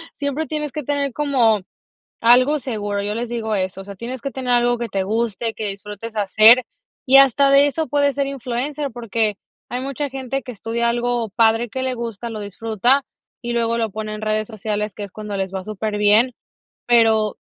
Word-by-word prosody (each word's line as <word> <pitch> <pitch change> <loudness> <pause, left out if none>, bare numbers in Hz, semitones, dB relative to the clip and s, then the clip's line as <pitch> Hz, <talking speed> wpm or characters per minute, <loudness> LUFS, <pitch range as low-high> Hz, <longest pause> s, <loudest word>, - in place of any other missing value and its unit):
siempre 285 +2 -2
tienes 300 -2 -3
que 300 - -5
tener 280 -1 -1
como 245 -8 +2 0.6
algo 255 +6 +5
seguro, 210 -7 -3
yo 205 - -2
les 235 0 -3
digo 225 -2 -2
eso, 190 0 -2
o - - -9
sea, 200 0 -9
tienes 235 +5 -6
que 275 - -4
tener 255 -2 -3
algo 240 0 +3
que 235 -1 -3
te 195 -1 -1
guste, 225 +2 -1
que 215 - -4
disfrutes 210 +3 -7
hacer, 215 +4 +6 0.4
y 270 +1 +7
hasta 275 +1 +5
de 280 +1 +6
eso 310 +2 -2
puedes 285 0 +1
ser 280 - 0
influencer, 275 +2 -3
porque 225 -3 -1 0.3
hay 250 +1 -3
mucha 275 +1 -3
gente 270 0 -4
que 250 - -7
estudia 235 +1 -1
algo 240 -1 -1
padre, 225 +2 +2
que 260 +4 -4
le 260 -1 -1
gusta, 235 -1 -5
lo 215 - -5
disfruta, 225 +6 0 0.4
y 240 - -2
luego 230 0 +1
lo 225 -1 0
pone 215 +1 -5
en 215 - -7
redes 215 0 -1
sociales, 210 -2 -3
que 210 - -7
es 200 - -8
cuando 210 -1 -6
les 190 -1 -2
va 190 -1 -4
superbién, 215 +3 +2 0.5
pero 225 -3 +3
235 Hz, 195 wpm, -21 LUFS, 215-260 Hz, 0.6 s, y